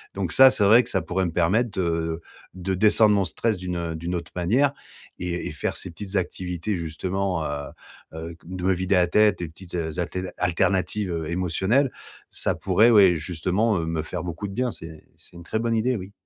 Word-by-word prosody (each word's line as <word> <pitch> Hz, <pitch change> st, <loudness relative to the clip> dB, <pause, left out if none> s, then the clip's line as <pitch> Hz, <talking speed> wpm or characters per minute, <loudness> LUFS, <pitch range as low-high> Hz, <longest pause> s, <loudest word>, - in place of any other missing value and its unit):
donc 95 Hz, -4 st, -2 dB
ça, 135 Hz, 0 st, +8 dB
c'est 105 Hz, -, 0 dB
vrai 110 Hz, +5 st, +7 dB
que -, -, -5 dB
ça 95 Hz, -, 0 dB
pourrait, 90 Hz, +3 st, -1 dB
me 85 Hz, -, -2 dB
permettre 95 Hz, +9 st, +2 dB
de 80 Hz, -1 st, -1 dB, 0.3 s
de 95 Hz, +1 st, -3 dB
descendre 105 Hz, +2 st, +5 dB
mon 100 Hz, -, +2 dB
stress 110 Hz, +3 st, -1 dB
d'une, 90 Hz, -1 st, -4 dB
heu, 85 Hz, -1 st, -3 dB
d'une 85 Hz, +3 st, -3 dB
autre 85 Hz, -2 st, -5 dB
manière 125 Hz, +11 st, +2 dB, 0.5 s
et 90 Hz, -1 st, -3 dB
et -, -, -4 dB
faire -, -, -3 dB
ces 90 Hz, -, -4 dB
petites 100 Hz, +3 st, -7 dB
activités, 90 Hz, +1 st, -2 dB
justement, 90 Hz, +1 st, -2 dB
heu 70 Hz, -1 st, -4 dB, 0.4 s
heu 80 Hz, +1 st, -7 dB
de 90 Hz, +1 st, -7 dB
me 95 Hz, -, +4 dB
vider 95 Hz, +2 st, 0 dB
la 90 Hz, -1 st, +4 dB
tête, 105 Hz, +2 st, +4 dB
des 85 Hz, -, -3 dB
petites 90 Hz, +2 st, -10 dB
a 85 Hz, -2 st, -2 dB
altél 90 Hz, 0 st, -4 dB
alternatives, 95 Hz, +2 st, 0 dB
heu, 80 Hz, -2 st, -3 dB
émotionnelles. 95 Hz, -, +1 dB, 0.4 s
Ça -, -, 0 dB
pourrait 115 Hz, +3 st, +4 dB
ouais, 100 Hz, -5 st, +6 dB
justement, 90 Hz, +6 st, 0 dB
heu, 80 Hz, -, -2 dB
me 80 Hz, -1 st, -2 dB
faire 80 Hz, -, -5 dB
beaucoup 90 Hz, +4 st, -5 dB
de 95 Hz, -, -8 dB
bien. 125 Hz, +2 st, -1 dB
C'est 80 Hz, -1 st, -10 dB
c'est -, -, -17 dB
une 85 Hz, -, -10 dB
très 110 Hz, +5 st, -2 dB
bonne 115 Hz, 0 st, 0 dB
idée, 120 Hz, +3 st, +1 dB
oui. 95 Hz, +1 st, -8 dB
90 Hz, 210 wpm, -24 LUFS, 85-105 Hz, 0.5 s, ça